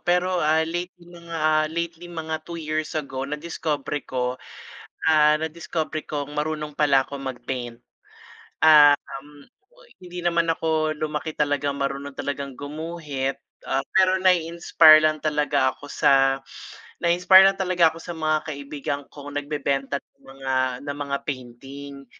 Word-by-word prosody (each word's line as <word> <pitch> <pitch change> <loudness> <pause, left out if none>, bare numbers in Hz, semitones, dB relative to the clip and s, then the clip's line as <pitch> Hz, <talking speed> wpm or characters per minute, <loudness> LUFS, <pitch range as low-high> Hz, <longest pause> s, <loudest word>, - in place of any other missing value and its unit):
pero, 180 0 +1
ah, 155 +1 +3
lately, 175 +1 -5
mga, 165 -3 -1
lately, 170 +1 -5
mga 160 -2 -4
2 170 - -5
years 155 0 -3
ago, 135 -2 -4
nadiskobre 150 -1 -3
ko, 125 0 -2 0.6
ah, 150 -1 +5
nadiskobre 160 0 -4
kong 145 -1 -4
marunong 150 0 -3
pala 140 -2 +3
akong 140 0 -8
mag-paint. 120 -1 -5 0.8
Ah, 150 -2 +7 0.2
um, 145 -1 -17 0.3
oy, - - -19 0.2
hindi 180 0 -8
naman 170 -1 +1
ako 160 -1 0
lumaki 155 +1 -3
talagang 145 -1 -1
marunong 140 0 -3
talagang 140 -1 -4
gumuhit. 145 -2 -4 0.2
Ah, 135 - -1
pero 190 0 +4
nai-inspire 170 -3 +5
lang 155 0 +2
talaga 145 -3 +1
ako 145 - -13
sa, 135 -1 +3 0.6
na-inspire 180 +2 +6
lang 195 - -4
talaga 180 -3 +3
ako 165 - -10
sa 175 - -6
mga 155 -1 +1
kaibigan 140 0 -4
kong 145 0 -7
nagbebenta't 140 -1 -2
ng - - -36 0.2
mga, 135 -1 -3 0.3
na 145 - -3
mga 140 -1 -3
painting. 135 +2 -8
150 Hz, 135 wpm, -24 LUFS, 140-165 Hz, 0.8 s, Ah